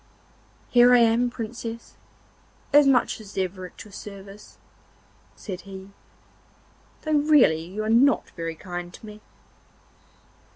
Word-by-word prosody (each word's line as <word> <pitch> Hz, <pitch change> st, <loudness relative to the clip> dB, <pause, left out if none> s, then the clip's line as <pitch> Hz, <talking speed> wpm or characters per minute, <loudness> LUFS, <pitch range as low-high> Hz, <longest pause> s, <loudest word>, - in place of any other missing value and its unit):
'Here 245 Hz, 0 st, +6 dB
I -, -, +7 dB
am, 235 Hz, +1 st, +3 dB
Princess, 230 Hz, -1 st, -7 dB, 0.8 s
as 290 Hz, -1 st, +7 dB
much 250 Hz, -4 st, +2 dB
as 205 Hz, -2 st, -13 dB
ever 185 Hz, 0 st, -3 dB
at -, -, -13 dB
your 210 Hz, -, -15 dB
service,' 200 Hz, 0 st, -11 dB, 0.8 s
said 185 Hz, -4 st, -7 dB
he, 190 Hz, +1 st, -11 dB, 1.1 s
'though 310 Hz, -1 st, +1 dB
really 290 Hz, -, +4 dB
you 200 Hz, +5 st, -5 dB
are -, -, -3 dB
not 265 Hz, +5 st, +3 dB
very 165 Hz, -1 st, -5 dB
kind 175 Hz, 0 st, -7 dB
to -, -, -14 dB
me. 210 Hz, 0 st, -11 dB
215 Hz, 125 wpm, -24 LUFS, 190-245 Hz, 1.1 s, I